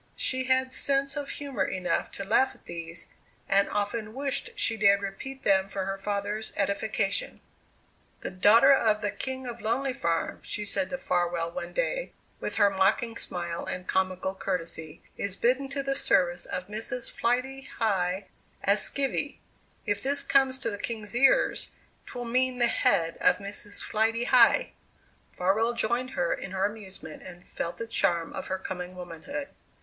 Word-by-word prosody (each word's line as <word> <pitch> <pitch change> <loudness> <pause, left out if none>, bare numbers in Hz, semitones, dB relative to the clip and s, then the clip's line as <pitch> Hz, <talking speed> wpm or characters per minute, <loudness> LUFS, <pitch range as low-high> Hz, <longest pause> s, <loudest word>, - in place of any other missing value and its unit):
She 260 0 +1
had 260 0 +2
sense 275 0 +2
of 290 -1 -4
humour 275 -9 -2
enough 185 -1 -1
to 195 - -5
laugh 235 +6 +2
at - - -24
these, 170 0 -5 0.4
and 200 0 +3
often 215 +2 -2
wished 275 0 -2
she 225 - +2
dared 200 -2 +4
repeat 265 +8 -6
them 190 -1 +3
for 195 -1 -3
her 195 0 -2
father's 205 +2 -2
edification. 200 0 0 0.8
"The - - -4
daughter 220 +8 +6
of 215 -5 +3
the 205 -1 -1
King 260 -1 -4
of 240 -1 -6
Lonely 255 +5 0
Farm," 170 -10 -1
she 210 - -3
said 195 -2 +2
to 270 - -3
Farwell 175 -5 0
one 270 - -5
day - - -1 0.3
with - - -4
her 205 -2 +5
mocking 195 +4 +2
smile 175 -5 -3
and 180 0 -5
comical 190 0 0
courtesy 165 -4 -4
"is 200 -2 -1
bidden 260 +5 +1
to 275 0 -3
the 275 0 0
service 180 -9 +2
of 185 - -4
Mrs. 225 +4 -1
Flighty 255 +3 0 0.2
High 195 -3 0 0.4
as 200 +2 +4
skivvy. 280 +1 -1 0.5
If 205 -1 0
this 280 +1 0
comes 265 -1 +3
to 230 - -1
the 205 - -5
king's 220 -1 -3
ears, 270 +3 +3 0.3
'twill 245 -1 -6
mean 255 +2 +1
the 240 - +4
head 165 -7 +2
of - - +4
Mrs. 205 0 -1
Flighty 225 +2 +1
High!" - - +5 0.7
Farwell 215 +6 +2
joined 240 +2 0
her - - +2
in 195 - -5
her 190 +1 +1
amusement 200 -6 -7
and 180 -1 -11
felt 170 - -4
the 230 - -4
charm 170 -7 0
of - - -5
her 190 - -1
coming 180 -1 -6
womanhood. 180 - -6
210 Hz, 165 wpm, -28 LUFS, 190-255 Hz, 0.8 s, daughter